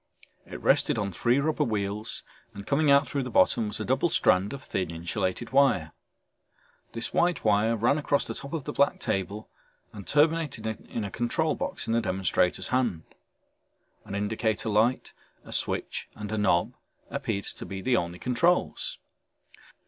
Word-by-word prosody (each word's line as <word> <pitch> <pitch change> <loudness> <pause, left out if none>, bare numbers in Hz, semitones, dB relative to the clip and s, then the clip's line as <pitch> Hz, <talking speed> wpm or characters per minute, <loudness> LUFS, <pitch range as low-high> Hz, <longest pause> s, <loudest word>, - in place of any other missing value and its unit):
It - - -7
rested - - +3
on 100 -1 -1
three 120 +8 +2
rubber 155 +1 +1
wheels 105 -3 -1 0.3
and 100 0 -8
coming 145 +1 +2
out 140 0 +5
through 140 - -2
the 125 - -4
bottom 110 0 +3
was 105 - -3
a 110 - -3
double 135 +7 +1
strand 95 - +3
of 140 -1 -7
thin 95 -8 -2
insulated 85 +3 -3
wire. 135 - +3 1.0
This 115 - -3
white 175 -5 +1
wire 110 +2 +3
ran 120 +7 +2
across 145 -1 +1
the - - -5
top 140 - -7
of 160 -4 -2
the - - -5
black 140 - +2
table 105 -1 -3 0.5
and 100 -3 -10
terminated 150 -6 +2
in 110 0 -4
a 100 - -5
control 150 - 0
box - - -4
in 115 - -1
the 115 - +3
demonstrator's 95 -3 0
hand. 120 -11 0 1.0
An 100 - -7
indicator 110 +2 -1
light, 110 +5 +1 0.3
a - - -11
switch - - -2
and 105 -1 -6
a 110 - -1
knob 90 -4 +2 0.4
appeared 100 - -2
to - - -6
be 95 - -5
the 125 +6 +1
only 85 -2 -1
controls. 175 - +1
110 Hz, 165 wpm, -27 LUFS, 100-140 Hz, 1.0 s, out